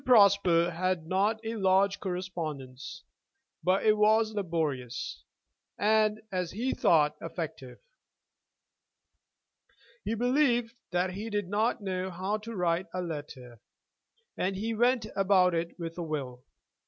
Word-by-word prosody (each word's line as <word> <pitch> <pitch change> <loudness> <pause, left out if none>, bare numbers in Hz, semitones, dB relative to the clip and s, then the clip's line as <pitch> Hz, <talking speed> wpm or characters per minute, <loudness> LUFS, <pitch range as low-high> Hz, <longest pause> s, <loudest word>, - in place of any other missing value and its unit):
Prosper 200 -7 +5
had 180 -1 -1
not 200 +5 +1
a 225 +1 -3
large 195 0 +3
correspondence, 165 -6 -5 0.6
but 185 +3 +2
it 215 -1 +5
was 220 +1 +3
laborious, 145 - -3 0.5
and, 215 0 +3
as 180 -2 -1
he 240 +7 -2
thought, 165 - +3
effective. - - -6 2.3
He 220 +2 -1
believed 245 -1 +2 0.2
that 180 +1 0
he 205 +5 -5
did 205 -3 -2
know 200 -3 -1
how 190 +4 -2
to 225 +2 -8
write 175 0 0
a 185 - -1
letter, 145 -8 -7 0.7
and 190 +1 -1
he 220 +4 -2
went 240 +1 +2
about 190 -2 +4
it 170 0 -2
with 165 -1 -6
a - - -2
will. 135 -6 -5
185 Hz, 120 wpm, -29 LUFS, 170-215 Hz, 2.3 s, Prosper